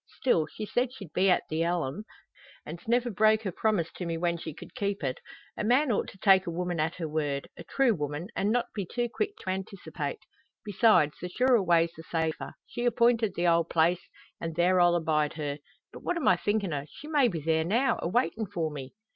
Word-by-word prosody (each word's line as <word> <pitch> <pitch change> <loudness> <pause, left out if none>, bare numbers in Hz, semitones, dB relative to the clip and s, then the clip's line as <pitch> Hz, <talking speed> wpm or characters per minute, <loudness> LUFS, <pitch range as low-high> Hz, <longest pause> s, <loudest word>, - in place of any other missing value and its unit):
Still, 170 - +2
she 215 - -6
said 245 +4 0
she'd 195 - -11
be 190 +1 +3
at 180 - +3
the 155 +1 -2
elim, 170 +1 -1 0.6
an's 170 +5 -9
never 240 +1 +2
broke 215 +2 +3
her 195 - -2
promise 190 -3 0
to 180 - -6
me 165 -1 -2
when 170 0 0
she 165 -1 -6
cud - - -12
keep 200 -6 -2
it. 130 -2 -2 0.4
A - - -3
man 250 +5 +3
ought 205 - 0
to - - -11
take 190 -1 +4
a - - -1
woman 175 0 -2
at 160 +2 0
her 165 -3 -4
word 145 -3 -2
a - - -9
true 270 -4 +2
woman 150 0 -4
an' 200 - 0
not 240 +2 +2
be 205 - -2
too 240 +7 -2
quick 425 0 -2
to 185 - -2
anticipate. 190 - -5 0.5
Besides, 205 -7 +3
the 180 - -4
surer 250 +3 +3
way's 170 -2 +3
the 160 - -9
safer. 160 -1 -3
She 240 - -4
appointed 235 -3 +2
the 175 - 0
old 170 -1 +3
place, 170 +2 +1 0.3
an' 165 -1 -4
there 180 +3 +3
I'll 175 0 +5
abide 155 -3 +1
her. 145 -2 -4 0.3
But - - -9
what 355 - -1
am 330 - -1
I 185 - +6
thinkin' 200 -1 -1
o'? 145 0 -4
She 300 - -12
may 295 -5 +3
be 175 -8 -2
there 160 +1 +1
now, 235 +9 +1
a - - -1
waitin' 225 +1 0
for 165 -3 -2
me!" 140 +2 -8
180 Hz, 220 wpm, -28 LUFS, 160-220 Hz, 0.6 s, I